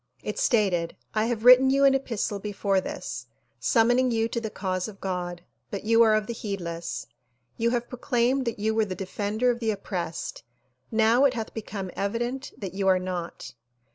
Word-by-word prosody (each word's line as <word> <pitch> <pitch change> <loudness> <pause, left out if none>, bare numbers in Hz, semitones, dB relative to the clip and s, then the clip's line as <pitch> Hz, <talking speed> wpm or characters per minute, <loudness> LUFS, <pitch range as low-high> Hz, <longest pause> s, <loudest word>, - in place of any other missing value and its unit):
It - - -3
stated 190 -8 +2 0.2
"I 215 0 +2
have 230 -1 -2
written 255 +1 +9
you 275 +1 +4
an 275 - +6
epistle 230 -6 -1
before 200 -1 0
this, - - -6 0.3
summoning 245 +2 +3
you 225 -1 +1
to 235 - -2
the 220 - -3
cause 185 -2 -2
of 200 -3 -10
God 175 -2 -4 0.3
but 200 - -5
you 230 +1 +4
are 220 -2 +6
of 215 -1 +1
the 235 - -4
heedless. 175 -7 -4 0.5
You 230 +1 +1
have 240 0 -1
proclaimed 250 +1 0
that 235 - -2
you 215 +1 0
were 220 -1 +2
the 190 -2 -5
defender 210 +5 0
of 235 - -4
the 225 -2 -1
oppressed; 180 -5 -4 0.5
now 225 +4 +4
it 265 -2 +3
hath 225 -2 -4
become 200 -4 -5
evident 240 +7 -2
that 195 -3 -6
you 195 0 -1
are 190 -1 +5
not. 175 -8 -5
215 Hz, 185 wpm, -26 LUFS, 190-240 Hz, 0.5 s, written